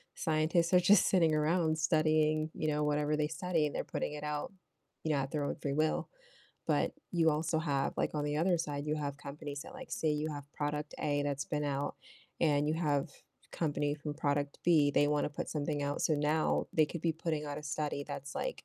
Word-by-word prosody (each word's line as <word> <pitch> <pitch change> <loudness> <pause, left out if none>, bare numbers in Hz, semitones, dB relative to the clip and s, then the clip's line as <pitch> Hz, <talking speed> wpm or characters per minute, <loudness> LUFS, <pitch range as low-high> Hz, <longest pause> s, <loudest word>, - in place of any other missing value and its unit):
scientists 165 +2 +1
are 180 - +8
just 190 +2 +6
sitting 165 -5 +4
around 160 +1 +2
studying, 155 0 +2
you 155 - -2
know, 150 0 +1
whatever 150 0 +1
they 150 0 +1
study, 170 -2 0
and - - -7
they're - - -1
putting - - -3
it 150 0 -6
out, 150 +2 -3 0.5
you 155 - 0
know, 145 - +2
at 135 0 -3
their 150 -2 -1
own - - -1
free 140 -1 -1
will, 155 +1 +1 0.6
but - - +2 0.2
you 165 -2 +4
also 155 +1 0
have 140 -4 0
like, - - +1
on 150 -1 0
the 150 0 -1
other 175 +2 +2
side, 145 -3 -3
you 150 +1 0
have 140 -2 -3
companies 145 0 -6
that, - - -11
like 265 -1 -10
say 160 - 0
you 150 +1 0
have 145 -1 -8
product 150 0 -3
A 145 -1 +1
that's 140 -1 -1
been 150 -1 -2
out, 140 0 -1 0.5
and 150 -2 +3
you 155 - +1
have 145 -4 +1 0.4
company 145 -2 0
from 150 0 -5
product 145 -2 -1
B, 155 -4 +5
they 145 - +3
wanna 150 0 +1
put - - -5
something 145 -1 -2
out, 145 0 -2
so 155 - +3
now 150 +2 +1
they 155 - +5
could 170 +2 -6
be 165 -1 +2
putting 155 -1 -2
out 145 - -4
a 150 - -8
study 150 -1 -2
that's, 140 +1 -6
like, - - -3
150 Hz, 220 wpm, -33 LUFS, 145-160 Hz, 0.6 s, are